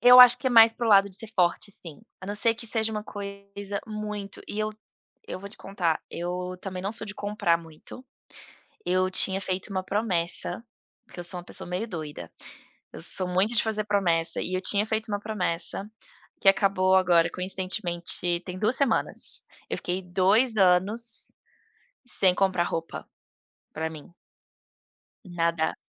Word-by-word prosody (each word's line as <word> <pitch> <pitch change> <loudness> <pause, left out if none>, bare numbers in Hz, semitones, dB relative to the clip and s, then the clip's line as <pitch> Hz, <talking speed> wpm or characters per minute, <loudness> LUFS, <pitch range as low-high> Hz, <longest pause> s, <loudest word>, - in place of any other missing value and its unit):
eu 245 +2 +9
acho 250 -1 +9
que 260 - -5
é - - +3
mais 225 -1 +8
pro 240 - -3
lado 200 -1 +6
de 185 - -2
ser 225 0 -9
forte 180 +3 +1
sim, 165 -6 -10 0.2
a 190 - -9
não 205 - -3
ser 225 +2 +2
que 230 +1 -8
seja 220 0 +1
uma 210 -1 -4
coisa 200 0 -6
muito 210 -2 -6
e 210 - -5
eu 215 0 0 0.6
eu - - -5
vou 200 +2 -9
te 205 - -17
contar. 175 -5 -1
Eu 180 +1 -4
também 185 -1 -6
não 200 - -2
sou 220 -1 -3
de 205 - -8
comprar 205 -5 0
muito, 165 +9 -12 0.8
eu 185 +1 +2
tinha 190 +1 +2
feito 185 +2 -3
uma 185 -1 -2
promessa, 190 -3 -1 0.4
porque 185 - -11
eu 175 - -6
sou 180 +1 -4
uma 175 - -9
pessoa 175 - -5
meio 180 +5 -2
doida. 155 - -7 0.6
Eu - - -9
sou 185 - -2
muito 190 +6 +1
de - - +4
fazer 215 -1 -1
promessa 175 -6 +1
e 185 - -3
eu 185 - 0
tinha 205 +2 +2
feito 220 0 -2
uma 205 -1 -1
promessa, 195 -1 -1 0.5
que - - +4
acabou 195 -1 +2
agora 175 -2 +4
coincidentemente 180 -2 -2
tem 180 0 -6
2 220 +5 +3
semanas. 270 -6 +1 0.3
Eu - - -1
fiquei 180 +2 -3
2 195 +7 +3
anos, 200 +6 +2 0.8
sem 190 -6 +3
comprar 190 -2 +2
roupa 165 -1 -5 0.7
pra 160 +1 -3
mim. 160 +1 -12 1.1
Nada. 170 -2 -1
195 Hz, 170 wpm, -26 LUFS, 180-215 Hz, 1.1 s, eu